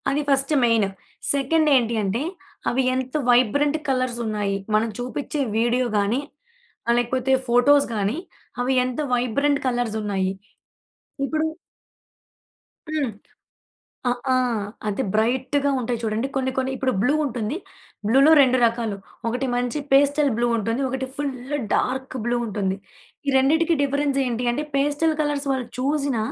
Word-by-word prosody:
అది 285 +2 +1
first 275 +2 +2
main. 230 -4 +3 0.5
Second 305 +3 +2
ఏంటి 235 -2 +2
అంటే 200 +5 -1 0.5
అవి 260 +2 +1
ఎంత 260 0 -3 0.2
వైబ్రెంట్ 270 +5 +3
కలర్స్ 255 -2 0
ఉన్నాయి? 205 -2 -1 0.2
మనం 220 +2 +2
చూపించే 270 +4 -4 0.2
వీడియో 240 +2 +2
గాని 205 +5 +1 0.7
ఆహ్, 235 - +5
లేకపోతే 255 +2 0 0.2
ఫోటోస్ 275 +4 +5
గాని 205 +6 0 0.4
అవి 255 +2 +1
ఎంత 255 +1 -4
వైబ్రెంట్ 280 +4 +1
కలర్స్ 240 -3 -1
ఉన్నాయి. 195 -2 -1 0.9
ఇప్పుడు 310 +3 0 1.4
హ్మ్. 305 -5 0 1.0
అ! - - +3 0.2
ఆ! - - +4 0.5
అది 205 - -1
బ్రైట్‌గా 260 +6 +1
ఉంటాయి 240 -1 -2
చూడండి 220 +3 -1
కొన్ని 260 -1 0
కొన్ని 260 0 0
ఇప్పుడు 260 0 0
బ్లూ 250 +7 +3
ఉంటుంది. 245 +2 -3 0.5
బ్లూలో 270 +7 +6
2 255 -1 +4
రకాలు 230 -2 -1 0.3
ఒకటి 250 +4 -1
మంచి 245 +4 -1
పేస్టల్ 285 +1 +4
బ్లూ 240 0 +2
ఉంటుంది. 230 +4 -1
ఒకటి 265 +1 -2
ఫుల్లు 275 -1 -3 0.2
డార్క్ 260 0 -1
బ్లూ 240 0 +1
ఉంటుంది. 195 -3 -2 0.5
ఈ - - +4
రెండిటికి 320 +5 +3
డిఫరెన్స్ 280 0 0
ఏంటి 245 0 -1
అంటే 290 +5 -2
పాస్టెల్ 290 +3 +2
కలర్స్ 295 -1 -1
వాళ్ళు 260 -3 -2
చూసిన 280 -1 0
255 Hz, 135 wpm, -23 LUFS, 235-280 Hz, 1.4 s, బ్లూలో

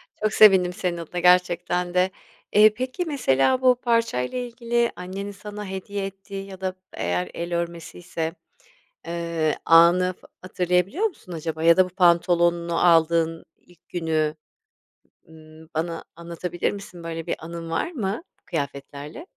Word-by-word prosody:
Çok 215 0 -1
sevindim 190 -4 +6
senin 175 -1 -2
adına 170 +1 -5
gerçekten 180 0 +2
de. 185 +1 +2 0.4
Eee, 210 0 +7
peki 255 - -3
mesela 260 - +2
bu 255 -1 +5
parçayla 230 - 0
ilgili 235 -1 -1
annenin 195 +3 -6
sana 210 +1 -8
hediye 195 +1 -4
ettiği 195 0 -7
ya 190 -1 -11
da 185 -1 -2 0.2
eğer 90 +1 -2
el 170 +1 -4
örmesiyse, 170 -1 -4 0.7
eee, 170 -2 -1
anı 175 +2 +5
f - - -17 0.2
hatırlayabiliyor 180 - 0
musun 255 - -8
acaba 160 0 -4
ya 170 0 +6
da 185 - +6
bu - - -7
pantolonunu 170 -1 +2
aldığın 165 -1 +3
ilk 175 -1 -25
günü, 160 -3 -1 1.0
ııı, 160 0 -15
bana 165 +1 -2
anlatabilir 170 +1 -3
misin? 190 -4 -9
Böyle 165 -1 -5
bir - - 0
anın 165 0 -7
var 165 - -1
mı 220 - -3 0.2
kıyafetlerle? 145 - -5
175 Hz, 135 wpm, -24 LUFS, 165-195 Hz, 1.0 s, Eee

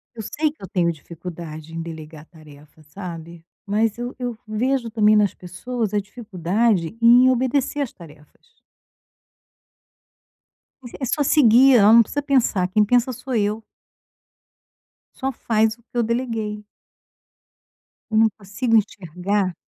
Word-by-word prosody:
Eu 225 - -6
sei 305 +8 -1
que 305 - -17
eu - - -6
tenho 170 -2 0
dificuldade 165 -1 -10
em 165 - -4
delegar 160 -2 -9
tarefa, 155 -2 -18
sabe. 170 0 -9 0.2
Mas 215 +2 0
eu 245 +1 -6
eu 245 -2 -4
vejo, 240 +3 -1
também, 215 -1 +3
nas 210 -2 +2
pessoas 215 +4 -5
a 210 - +2
dificuldade 205 -2 -1
em 245 +2 +7
obedecer 260 +3 0
as 275 - -3
tarefas. 160 - -18 2.3
Mas 240 -2 -11
é 265 - -2
só 290 +4 0
seguir, 260 -2 +5
ela 210 0 +6
não 230 - +8
precisa 290 +6 -4
pensar, 255 -10 +1
quem 210 +3 +2
pensa 245 +3 +2
sou 255 +2 -7
eu. 215 +1 -1 1.5
Só 270 0 -3
faz 220 -3 0
o 235 - -27
que 235 - -42
eu 240 - +2
deleguei. 225 -3 -3 1.5
Eu 220 - +1
não 220 0 +5
consigo 220 +4 -1
enxergar 190 -1 -2
215 Hz, 135 wpm, -21 LUFS, 180-245 Hz, 2.3 s, não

